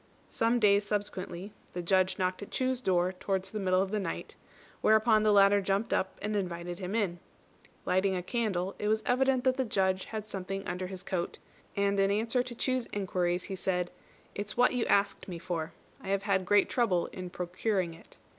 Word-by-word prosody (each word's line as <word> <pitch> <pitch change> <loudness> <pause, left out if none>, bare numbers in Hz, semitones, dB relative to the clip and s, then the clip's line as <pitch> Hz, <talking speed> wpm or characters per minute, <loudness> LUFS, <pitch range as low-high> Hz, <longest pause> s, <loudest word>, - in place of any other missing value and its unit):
Some 230 +2 +2
days 205 -2 +5
subsequently, 205 -2 -4 0.2
the 175 - -4
Judge 185 +1 +2
knocked 185 +1 -1
at 205 - -7
Chu's 260 -1 -1
door 180 -4 +2
towards 190 0 -2
the 215 - -3
middle 185 -1 +3
of 195 - -5
the 215 - 0
night; 195 - -5 0.5
whereupon 220 0 +5
the 215 0 +4
latter 200 0 +6
jumped 195 +3 0
up 190 - 0
and 210 0 -1
invited 175 -2 -3
him 190 +2 -3
in. 190 -6 0 0.7
Lighting 190 +1 +2
a 180 - -2
candle, 195 -4 -1
it 210 - -1
was 215 +1 +1
evident 260 0 +2
that 260 0 +2
the 265 - +2
Judge 190 -4 0
had 215 -1 -5
something 195 0 -4
under 180 +1 -3
his 185 -1 -7
coat, 185 -3 -3 0.4
and 200 0 +1
in 195 0 +4
answer 225 +5 +1
to 245 -1 -6
Chu's 255 0 0
inquiries, 180 -2 0
he 195 - -5
said, 180 -1 -1 0.4
"It's 205 +2 -4
what 245 +1 +5
you 250 -2 0
asked 200 0 +2
me 180 -3 -5
for. 165 -1 -3 0.3
I - - -10
have 195 0 0
had 190 -2 +1
great 205 0 +5
trouble 205 -9 +1
in 185 -1 -6
procuring 180 0 -1
it." 165 - -17
195 Hz, 195 wpm, -30 LUFS, 185-215 Hz, 0.7 s, latter